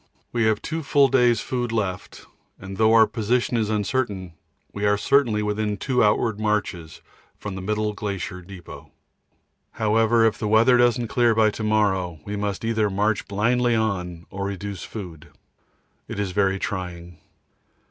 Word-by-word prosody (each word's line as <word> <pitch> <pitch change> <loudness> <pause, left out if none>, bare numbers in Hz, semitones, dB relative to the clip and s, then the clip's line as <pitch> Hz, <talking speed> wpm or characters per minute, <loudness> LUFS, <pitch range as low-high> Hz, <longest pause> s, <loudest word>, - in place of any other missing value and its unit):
We 120 -2 +1
have 110 -1 +1
two 160 +1 -3
full 140 -2 +3
days' 120 -3 +3
food 120 -2 -3
left, 100 -5 -4 0.3
and 95 0 -8
though 110 +1 +4
our 110 -1 +7
position 120 +3 -1
is 110 -2 0
uncertain, 105 -4 -2 0.4
we 100 - -5
are 105 0 +3
certainly 110 -1 +2
within 105 0 -1
two 125 +3 +1
outward 105 0 +1
marches 105 -7 -2 0.4
from 105 - -6
the 95 - -6
middle 105 +2 -1
glacier 100 -3 -5
depot. 90 -1 -11 0.8
However, 115 +1 +3
if 105 -2 +1
the 110 - -2
weather 115 +4 +5
doesn't 120 -1 +2
clear 120 -3 +3
by 110 -1 +4
to 110 - -6
morrow, 95 -6 +1
we 105 - -4
must 100 +1 -3
either 110 -2 +1
march 105 +2 0
blindly 120 +4 +1
on 90 -6 -2
or 100 0 -4
reduce 100 -1 -5
food. 85 -7 -8 0.8
It - - -6
is 100 -2 -2
very 95 0 +1
trying. 90 -4 -5
105 Hz, 155 wpm, -23 LUFS, 95-115 Hz, 0.8 s, our